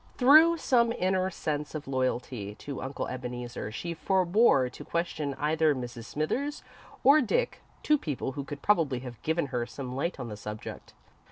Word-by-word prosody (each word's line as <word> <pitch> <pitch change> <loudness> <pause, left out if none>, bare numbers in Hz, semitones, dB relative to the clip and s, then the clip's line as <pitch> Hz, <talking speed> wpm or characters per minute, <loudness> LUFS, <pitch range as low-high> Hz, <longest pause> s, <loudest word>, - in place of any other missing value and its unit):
Through 310 +6 +7
some 235 -6 +3
inner 185 -1 +1
sense 150 -4 -3
of 150 - -5
loyalty 125 -5 -2
to 140 +4 -7
Uncle 135 +1 -4
Ebeneezer, 125 -3 -5
she 170 +9 -4
forebore 185 - +3
to - - -9
question 155 -4 -2
either 155 +1 +2
Mrs. 120 -2 -6
Smithers 260 - -2 0.4
or 285 +3 +7
Dick 485 - 0 0.2
two 300 -1 +3
people 145 - -3
who 140 +1 -5
could 140 0 -8
probably 155 -11 +2
have 125 -3 -9
given 160 0 0
her 120 -1 -1
some 130 -2 -6
light 145 +4 -2
on 125 - -4
the 105 - -6
subject. 105 +1 -8
145 Hz, 165 wpm, -29 LUFS, 125-185 Hz, 0.4 s, Through